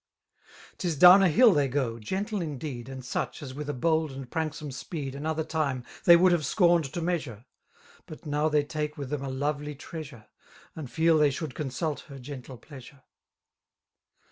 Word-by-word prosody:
'Us 170 -3 0
down 180 +6 +9
a 190 - +5
hfll 230 +6 +6
they 145 -2 +2
gOj 125 -4 -1
gentle 195 - -3
indeed. 140 -5 -5
And 130 -1 -8
such^ 125 - -4
as 130 -2 -7
with 150 +2 -6
a - - -1
bold 160 +3 +1
and 135 -1 -8
pranksome 155 0 -4
speed 135 +1 -5
M 140 - -7
Another 160 +1 -1
time 145 -6 -2 0.2
they 170 - +9
would 180 +2 +5
have 170 -3 +2
scorned 170 +1 +3
to 175 - -3
measure; 145 - -3 0.6
But 155 - -11
now 150 +1 0
they 150 -1 +2
take 150 0 -4
with 140 -2 -6
them 145 -2 -2
a 135 - -4
lovely 145 +2 -3
treasure^ 140 -6 -9 0.5
And 150 -5 -7
feel 160 +1 +3
they 150 -1 +5
should 140 0 -5
consult 150 +2 -3
her 140 - -9
gentle 130 -1 -9
pleaisure. 135 0 -14
150 Hz, 180 wpm, -27 LUFS, 135-160 Hz, 0.6 s, down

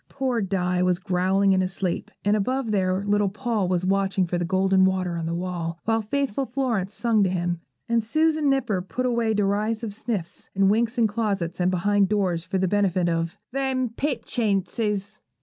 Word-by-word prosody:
Poor 260 -4 -1
Di 180 -2 0
was 180 -1 +2
growling 190 +1 +2
in 185 - +3
his 185 0 -2
sleep, 185 -3 -2 0.2
and 205 +1 +4
above 245 +3 -1
there 190 -1 +1
little 205 -1 +2
Paul 215 -1 -1
was 180 0 0
watching 195 0 +1
for 175 0 -2
the - - 0
golden 190 +1 +3
water 185 -2 +1
on 165 -1 -3
the 165 - -2
wall, 170 -2 -3
while 225 0 +1
faithful 270 +3 -1
Florence 230 -7 -1
sung 225 -3 +2
to 190 - +2
him, 175 -1 -2 0.3
and 235 -1 +1
Susan 310 +5 +2
Nipper 245 -9 +1
put 250 +7 -3
away 235 -3 +1
derisive 210 +2 0
sniffs 215 -5 -4
and 195 0 +4
winks 230 +3 +1
in 235 - +4
closets 200 -6 -1
and 180 0 +2
behind 195 +2 +2
doors 185 -5 0
for 185 +2 -2
the 190 0 +1
benefit 185 -2 +1
of 165 0 -1
'them 265 -1 0
Pipchinses.' 215 -5 -1
200 Hz, 185 wpm, -24 LUFS, 185-230 Hz, 0.3 s, and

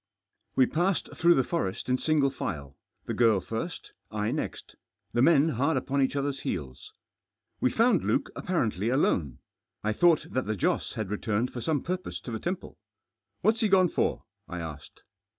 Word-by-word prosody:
We 130 - +6
passed 175 +5 0
through 170 +1 +5
the 130 - +3
forest 125 - -2
in 125 0 +1
single 150 -3 +2
file; 70 - -5 0.3
the - - -3
girl 115 -4 +4
first, 115 - -5 0.2
I 105 0 -1
next; - - -4 0.4
the 120 - +2
men 155 +1 +5
hard 140 +3 +1
upon 140 +2 0
each 135 +1 +1
other's 140 -1 -1
heels. 70 -6 -5 0.7
We - - +3
found 230 - +3
Luke - - 0
apparently 110 - 0
alone. 85 - +1 0.5
I 110 0 +1
thought 170 +6 +4
that 130 - -1
the 110 - 0
Joss 95 - 0
had 105 -3 -4
returned 110 +3 -1
for 120 - -5
some 145 +3 0
purpose 185 +1 -3
to 120 - -7
the 110 - -3
temple. 185 +1 -5 0.3
" - - -55
What's 220 +1 +3
he 220 - +4
gone 185 -3 +5
for? - - 0
" - - -52
I 90 - -5
asked. 75 -4 -8
130 Hz, 180 wpm, -28 LUFS, 105-165 Hz, 0.7 s, We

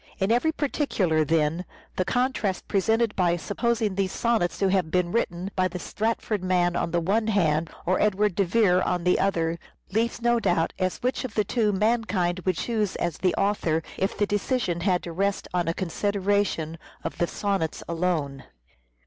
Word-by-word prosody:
In 195 +2 +1
every 245 +7 +3
particular, 225 - 0
then, 160 +2 +1 0.3
the 185 - 0
contrast 245 -6 0
presented 225 +2 +1
by 175 -2 +2
supposing 220 +3 -1
those 190 0 -1
sonnets 230 -7 0
to 195 - +2
have 185 -4 +1
been 180 0 +1
written 185 -4 -1
by 185 -1 +2
the 180 0 -6
Stratford 215 +1 -2
man 175 -1 +2
on - - 0
the 170 +1 +1
one 205 +6 +1
hand 165 -6 +2 0.2
or 185 +2 +1
Edward 210 -1 +2
de 200 - +2
Vere 185 -1 +3
on 180 -2 0
the 180 +1 +3
other, 170 -4 0 0.3
leaves 230 +4 0
no 240 0 +2
doubt 170 -6 +1
as 185 -1 0
to - - -14
which 255 +3 -1
of 255 -5 -6
the 210 - +3
two 215 +1 +1
mankind 205 -4 +1
would 185 -3 +1
choose 215 -4 -1
as 170 - -2
the 185 -2 +1
author 175 -6 +1
if 190 +1 -1
the 205 - +2
decision 205 -3 -1
had 180 -1 +1
to 170 - -6
rest 195 +4 -1
on 175 -2 0
a - - +2
consideration 195 -3 -1 0.2
of - - -5
the 175 - +2
sonnets 195 -6 -2
alone. 165 -6 -1
190 Hz, 185 wpm, -26 LUFS, 175-215 Hz, 0.3 s, every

